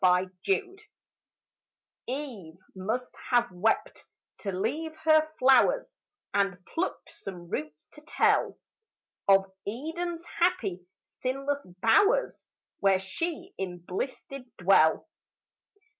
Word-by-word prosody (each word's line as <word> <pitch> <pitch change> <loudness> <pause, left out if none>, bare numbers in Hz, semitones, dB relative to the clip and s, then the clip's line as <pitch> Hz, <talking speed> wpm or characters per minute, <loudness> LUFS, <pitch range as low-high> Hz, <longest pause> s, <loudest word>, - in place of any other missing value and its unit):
EVE'S 180 0 +4
FLOWERS 390 +1 -1 1.2
Eve 240 - -5 0.2
must 220 +7 -3 0.2
have 240 -3 +3
wept 185 +5 0 0.3
to 200 - -3
leave 295 - -2
her 310 0 +5
flowers, 270 - +4 0.4
And 195 -2 +1
plucked 360 +3 -3
some 190 - -9
roots 150 0 -5
to 300 - -14
tell 305 - +2 0.7
Of 195 0 +6 0.2
Eden's 330 +9 -4
happy, 200 - +1 0.3
sinless 275 +2 -1 0.2
bowers, 405 - +4 0.4
Where 195 -1 +4
she 335 - -4
in 180 -2 -3
bliss 180 +9 -4
did 275 -2 -9
dwell. 175 - +4
245 Hz, 100 wpm, -28 LUFS, -, 1.2 s, Of